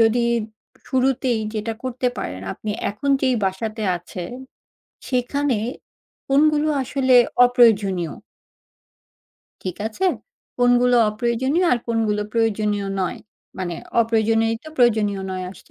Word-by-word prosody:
যদি 230 +1 +3 0.6
শুরুতেই 255 -3 +1
যেটা 215 +1 -2
করতে 255 0 -2
পারেন, 95 0 -5
আপনি 215 - -6 0.2
এখন 275 +7 -2
যেই 260 -1 +3
বাসাতে 215 +4 -3
আছে, 175 +1 -8 0.8
সেখানে 255 0 0 0.7
কোনগুলো 300 +2 +3
আসলে 260 0 +1 0.3
অপ্রয়োজনীয় 205 - +3 1.5
ঠিক 185 -2 -4
আছে? 230 +13 -3 0.5
কোনগুলো 245 0 +4
অপ্রয়োজনীয় 245 +9 0
আর 240 - +2
কোনগুলো 220 -3 0
প্রয়োজনীয় 210 -3 0
নয় 185 - -2 0.4
মানে 175 -2 -3 0.3
অপ্রয়োজনীয়ই 225 0 +2
তো 310 - -8
প্রয়োজনীয় 215 -5 +2
নয় 185 0 -4
আসছে 190 - -16
225 Hz, 105 wpm, -22 LUFS, 210-255 Hz, 1.5 s, কোনগুলো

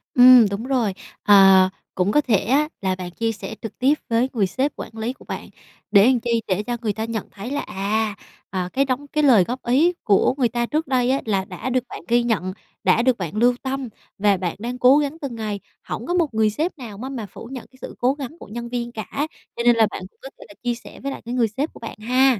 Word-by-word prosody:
Ừm, 250 -2 +9
đúng 200 +3 -4
rồi. 245 -7 +1 0.3
Ờ, 195 -2 +7 0.3
cũng 185 +2 +1
có 295 - +4
thể 235 -7 +2
á, 275 +10 +2
là 190 -1 0
bạn 180 -1 -7
chia 225 +4 -1
sẻ 220 0 -7
trực 225 - -8
tiếp 265 +3 +4 0.2
với 235 +3 +2
người 205 -5 +2
sếp 270 +9 -1
quản 225 - -9
lý 225 +3 -2
của - - -18
bạn, - - -6 0.4
để 200 -2 +7
làm 250 -1 +4
chi, 235 -1 0
để 190 +2 0
cho 240 +1 -3
người 215 -3 -1
ta 220 +2 -3
nhận 225 -2 -4
thấy 220 +6 -7
là, 285 - -1
à, 210 +2 -1 0.3
ờ, 180 -2 -3
cái 275 +1 +2
đóng 270 +2 -2
cái 300 +1 0
lời 235 -9 +6
góp 245 +7 -5
ý 285 +9 +3
của 205 +3 +3
người 245 -4 +2
ta 240 +1 -1
trước 305 +4 -1
đây 255 -2 +2
á, 275 - +1
là 195 -3 0
đã 260 - -5
được 255 -1 +1
bạn - - -7
ghi 240 0 +3
nhận, 195 -6 -1 0.3
đã - - +4
được 250 0 +2
bạn 175 0 -5
lưu 245 +3 +4
tâm 265 -1 -3 0.3
và 200 -1 +3
bạn 175 -2 -3
đang 245 +3 -4
cố 255 +3 +7
gắng 295 +1 -1
từng 265 -5 -4
ngày, 210 -2 -3 0.2
hổng - - -5
có 350 - 0
một 335 -8 +1
người 220 -1 +3
sếp 315 - -2
nào 225 -7 -8
má 260 +4 -6
mà 245 -5 -5
phủ 225 +4 -11
nhận 260 -3 -7 0.2
sự - - -8
cố 250 +2 +3
gắng 285 +3 -7
của - - -11
nhân 235 +3 -6
viên 240 -1 -3
cả, 245 +6 -3 0.3
cho 235 - -2
nên 240 0 +6
là 220 -2 +4
bạn - - -6
cũng - - -42
có 270 - -8
thể - - -11 0.2
chia 240 -1 0
sẻ 235 - -13
với 275 +1 -4
lại - - -7
cái 240 - -4
người 240 -3 +2
sếp 270 +9 -3
của - - -13
bạn 230 - -8
ha. 255 +1 +3
235 Hz, 260 wpm, -22 LUFS, 210-260 Hz, 0.4 s, Ừm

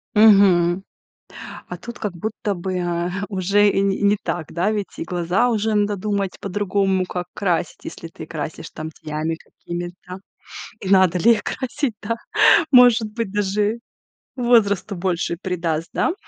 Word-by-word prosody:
Мгм. 195 -4 +5 0.9
А 180 - -5
тут, 235 +7 -9
как 210 -3 -3
будто 210 +3 -3
бы, 185 +1 -4
э, 175 -1 -1 0.2
уже 200 +1 +2
и 195 - +1
не 195 -1 +1
и - - -6
не 205 +1 +4
так, 165 -3 -4
да, 175 +5 +1
ведь 210 -2 -4
и - - -3
глаза 175 +6 +1
уже 220 -2 0
надо 205 0 +1
думать 200 -1 -2
по-другому, 195 -1 0
как 180 -1 -4
красить, 175 -4 -2
если 165 - -8
ты 160 -1 -10
красишь 155 +1 -6
там 155 0 -7
тенями 155 +1 -4
какими-то. 175 +2 -8 0.6
И 190 - -5
надо 185 -2 +5
ли 235 +7 +6
их 215 - -3
красить, 260 -2 -3
да? 230 +2 -2 0.6
Может 245 -4 +6
быть, 230 -3 -3
даже 205 +2 0 0.6
возрасту 220 -5 +2
больше 175 -1 -1
придаст, 165 -4 -2
да? 330 - +1
195 Hz, 155 wpm, -21 LUFS, 175-210 Hz, 0.9 s, ли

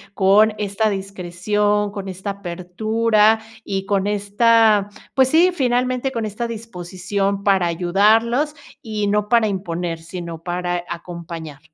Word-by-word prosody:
con 205 +3 +5
esta 210 +1 0
discreción, 200 +2 -1
con 200 -1 -6
esta 190 +2 -4
apertura 210 +4 +1 0.2
y 195 -1 -3
con 195 0 0
esta, 210 0 +3 0.2
pues, 265 -1 +4
sí, 340 +5 +5
finalmente, 255 -2 0
con 230 -3 -3
esta 215 +3 -3
disposición 200 -2 -3
para 195 -3 +3
ayudarlos 220 - +2 0.3
y 215 -2 -3
no 210 0 0
para 230 -2 +4
imponer, 175 -4 -3
sino 170 -1 -7
para 175 0 -2
acompañar. 170 -3 -7
200 Hz, 125 wpm, -20 LUFS, 180-220 Hz, 0.3 s, con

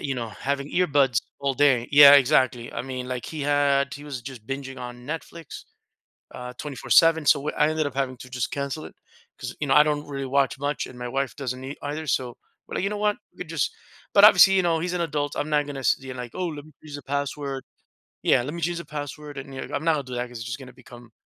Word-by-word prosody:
you 135 -1 -2
know, 115 -2 -4
having 140 +5 -3
earbuds 145 -9 +2 0.2
all 140 -1 0
day 130 -3 +3
yeah, 145 -1 +10
exactly. 125 -3 +3
I 115 - -3
mean, 130 -1 -5
like, 125 -1 -4
he 155 -2 -6
had 140 -1 +2
he 145 - -10
was 140 -4 -6
just 125 -4 -10
binging 135 0 -5
on 125 0 -8
Netflix, 165 +2 -7 0.7
uh, 125 0 -7
24/7, 155 +2 +3
so 140 - +5
what 150 - -3
I 150 - +4
ended 155 -1 0
up 140 - -5
having 135 -1 -2
to 125 - -11
just 125 -1 -2
cancel 140 - -4
it - - -14 0.4
'cause, - - -6
you 150 - -1
know, 135 - +3
I 150 - +8
don't 150 -1 -1
really 135 -1 -4
watch 135 0 +1
much 145 +2 -2
and 125 - -12
my 125 - -5
wife 135 +1 -2
doesn't 130 -2 -4
ei 135 +2 -6
either. 150 +2 -4
So 125 -4 -1 0.3
but, - - -3
you 195 - +1
know 210 - -4
what? 210 0 +1 0.2
We - - -6
just 160 -4 -1 0.4
but 200 - +8
obviously, 195 -2 +8
you 190 - +4
know, 165 -2 +2
he's 180 +2 -2
an 180 - -1
adult. 150 -3 -2
I'm 150 - -2
not 150 -1 +2
gonna 140 -2 -6
s 130 - +3
you 130 -1 -8
know 125 - -6
like, 120 - -8
"Oh, 185 - -2
let 145 -2 -7
me 155 - -17
change 150 -2 -11
the 145 - -10
password" 140 0 -3 0.6
yeah, - - +4
"Let 140 +4 -5
me 170 - -6
change 175 +1 -1
the 170 - -7
password," 150 0 -7
and, 135 0 -8
you 130 - -5
know, - - -8
I'm 155 - -4
not 165 - +4
gonna 145 - -1
do - - -4
that 120 - -1
because 120 -1 -9
it's 115 - -6
just 120 +1 -4
gonna 130 -2 -11
become 120 -2 -15
140 Hz, 255 wpm, -25 LUFS, 130-150 Hz, 0.7 s, yeah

